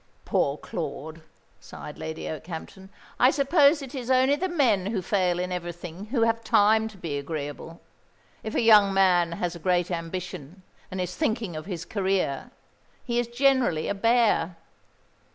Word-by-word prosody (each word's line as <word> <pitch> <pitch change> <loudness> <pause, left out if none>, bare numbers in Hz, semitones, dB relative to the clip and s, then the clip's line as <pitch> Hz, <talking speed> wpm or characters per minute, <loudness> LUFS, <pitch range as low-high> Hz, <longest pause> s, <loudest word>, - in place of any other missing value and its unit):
"Poor - - +1
Claude," 160 +3 -6 0.4
sighed - - -10
Lady 160 0 -5
Okehampton. 170 +4 -7 0.3
"I 250 - +6
suppose 285 +1 +4
it 270 0 -9
is 255 -3 -5
only 260 +2 +4
the 370 +5 -2
men 235 - +2
who 210 -1 -1
fail 180 -2 +1
in 180 +1 -3
everything 175 +1 -6
who 235 +1 -1
have 230 0 +1
time 220 +1 +4
to 215 -3 -12
be 155 -6 -4
agreeable. 145 +2 -6 0.6
If 220 - -6
a - - +2
young 210 -3 +6
man 175 -3 +3
has 175 0 -3
a - - -8
great 180 +1 +1
ambition, 175 0 -6 0.3
and 185 - -5
is 180 -1 -3
thinking 225 - -1
of 155 +2 -7
his 175 -5 -5
career, 190 -8 -1 0.5
he 240 -1 -1
is 240 - -1
generally 250 - +2
a - - 0
bear. 225 -4 +2
190 Hz, 160 wpm, -26 LUFS, 170-235 Hz, 0.6 s, I